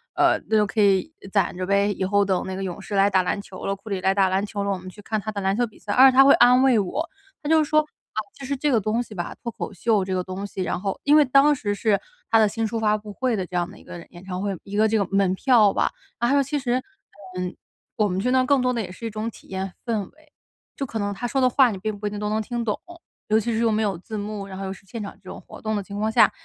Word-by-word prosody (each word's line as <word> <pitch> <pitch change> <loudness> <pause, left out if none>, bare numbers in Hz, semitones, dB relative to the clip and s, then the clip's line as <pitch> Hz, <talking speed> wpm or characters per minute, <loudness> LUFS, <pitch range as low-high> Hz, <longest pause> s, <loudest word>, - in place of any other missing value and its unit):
呃， - - +3
就 215 -1 +2
可 215 - 0
以 200 +9 +3 0.2
攒 200 -3 +1
着 185 - -2
呗。 200 +1 +2
以 190 - -3
后 200 +1 +2
等 190 -2 0
那 190 - -4
个 195 - -4
勇 190 +1 -5
士 200 - -5
来 195 +1 +4
打 190 -2 +3
篮 180 - -1
球 190 -2 -10
了， 195 - -1
库 200 +3 -13
里 195 -2 -2
来 190 +1 +3
打 195 -2 +3
篮 190 +1 +1
球 200 -1 -4
了， 200 - -1
我 195 - -1
们 185 0 -9
去 205 +3 -13
看 215 0 -2
他 215 - -4
的 205 -1 -4
篮 195 0 +1
球 245 0 +1
比 215 - -19
赛。” 205 - -3
而 265 +3 +8
且 - - -5
他 270 - +10
会 275 - +8
安 250 +2 +6
慰 255 -4 +5
我。 275 - -2 0.4
他 295 - -3
就 320 -1 +5
说： 305 +1 +3 0.3
“啊， - - -15 0.2
就 - - -9
是 280 +1 -2
这 295 +2 +1
个 235 - +4
东 215 +4 0
西 225 - -12
吧， 175 -2 -4
脱 235 - -3
口 - - -6
秀 205 +2 +1
这 190 - -3
个 180 - -1
东 185 +2 -5
西， 190 -1 -4
然 175 - -2
后” 195 -1 -3
因 290 +1 +6
为 305 - +7
当 275 +3 +5
时 205 -6 -2
是 205 -1 +1 0.3
他 225 - +6
的 215 - +5
新 225 +2 -2
书 225 +1 -3
发 215 -1 +2
布 210 -1 -10
会 255 +1 0
的 190 -3 -2
这 180 - -8
样 175 0 -1
的 - - -14
一 - - -17
个 170 - -9
演 175 0 -13
唱 185 -1 -4
会 200 -2 -2
一 200 - -8
个 215 +1 +4
这 220 +1 +1
个 200 - +1
门 195 -2 +3
票 225 -3 +4
吧， - - +1 0.3
然 240 +2 +2
后 280 0 +4
其 275 +3 -2
实， 245 -2 0 0.6
嗯， 180 0 -3 0.4
我 215 - +3
们 185 -1 -2
去 250 +6 0
那 260 0 +4
更 275 0 +3
多 250 0 +1
的 235 - -1
也 190 - -6
是 210 +5 -9
一 - - -2
种 215 +2 -3
体 - - -17
验 190 0 -4
氛 225 -4 -1
围。 305 +7 -23 0.5
就 275 - -2
可 230 - -5
能 205 0 -1
他 245 +5 -4
说 270 - -1
的 255 - +5
话 255 0 +5
你 200 - -5
并 210 +2 -4
不 210 - -3
一 - - 0
定 205 0 -6
都 210 - -2
能 215 +1 0
听 235 +2 -3
懂， 210 - -1 0.5
尤 215 +1 +4
其 230 +2 -2
是 220 - 0
又 230 -1 +2
没 215 +1 +1
有 200 -3 0
字 215 +4 -7
幕， 205 -1 -5
然 190 -1 -8
后 195 - -5
又 190 - -4
是 195 - -16
现 220 +3 -6
场 200 - -7
这 195 -2 -14
种 - - -8
活 - - -13
动 220 0 -1
的 205 - -2
情 200 +1 -9
况 215 +1 0
下， - - +5
210 Hz, 340 characters per minute, -24 LUFS, 195-235 Hz, 0.6 s, 他